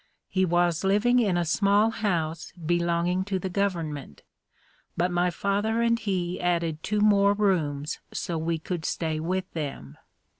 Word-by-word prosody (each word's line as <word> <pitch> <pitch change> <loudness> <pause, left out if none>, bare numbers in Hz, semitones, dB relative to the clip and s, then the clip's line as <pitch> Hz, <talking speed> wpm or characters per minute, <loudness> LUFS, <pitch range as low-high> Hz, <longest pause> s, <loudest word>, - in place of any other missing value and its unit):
He 190 0 +2
was 175 -1 +1
living 210 +6 +3
in 200 -7 +2
a 175 - +1
small 205 +5 +3
house 170 -8 -2
belonging 175 +1 0
to 195 -1 -1
the 185 0 -4
government, 165 - -3 0.7
but 180 +2 +1
my 175 0 +2
father 205 +5 0
and 230 0 +2
he 185 -5 -2
added 170 -3 0
two 210 +3 -1
more 200 -1 +5
rooms 160 -7 0
so 170 - -3
we 165 +1 -1
could 165 +1 -4
stay 160 -2 -2
with 185 +3 -3
them. 135 - -6
180 Hz, 150 wpm, -26 LUFS, 165-200 Hz, 0.7 s, more